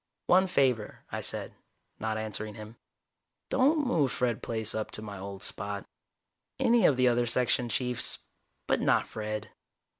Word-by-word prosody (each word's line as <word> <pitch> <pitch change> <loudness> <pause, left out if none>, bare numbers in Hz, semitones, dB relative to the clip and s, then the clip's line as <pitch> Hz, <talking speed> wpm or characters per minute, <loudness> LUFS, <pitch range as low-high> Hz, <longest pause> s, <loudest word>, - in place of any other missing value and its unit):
"One 190 +1 +5
favor," 130 - 0
I - - -3
said, - - -3 0.5
not 110 0 -2
answering 110 -1 -4
him. 110 +1 -10 0.7
"Don't 290 +3 +3
move 150 - +2
Fred 125 -4 0
Plaice 110 -2 0
up 110 -1 -2
to - - -7
my 100 -3 -7
old 100 0 -7
spot. 100 0 -3 0.7
Any 235 -1 +5
of 135 - +3
the 130 0 +4
other 120 0 +2
Section 125 0 +1
Chiefs, 125 +1 +2 0.5
but - - +1
not - - +3
Fred." 110 -1 -4
115 Hz, 150 wpm, -29 LUFS, 110-130 Hz, 0.7 s, One